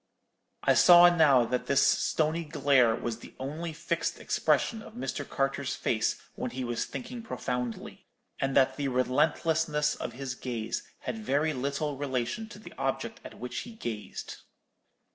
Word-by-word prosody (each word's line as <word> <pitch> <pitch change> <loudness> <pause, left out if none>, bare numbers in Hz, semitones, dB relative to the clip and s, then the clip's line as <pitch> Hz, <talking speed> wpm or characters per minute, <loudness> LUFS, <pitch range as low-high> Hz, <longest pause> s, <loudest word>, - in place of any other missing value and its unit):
I - - +5
saw 175 0 +8
now 140 -7 +5
that 125 +2 -2
this 140 - +4
stony 160 +2 +2
glare 140 -7 +3
was 120 0 -4 0.2
only 155 +6 -4
the 155 - -12
fixed - - -2
expression 225 -2 +1
of - - -12
Mr. 130 +1 -4
Carter's 135 0 -1
face - - 0
when - - -4
he 130 0 -4
was 120 -1 -2
thinking 245 -1 -7
profoundly, 125 - -4 0.3
and 135 0 -1
that 130 -1 +4
the 145 -1 -1
relentlessness 150 +4 +1
of - - -5
his 130 0 -4
gaze 115 -4 -3 0.2
had 225 - -4
very 155 -6 +1
little 140 +2 -2
relation 135 - -2
to - - -10
the 215 - -12
object 135 -3 -2
at - - -10
which 125 +1 -5
he 235 - -8
gazed. 110 - -6
140 Hz, 155 wpm, -29 LUFS, 125-160 Hz, 0.3 s, saw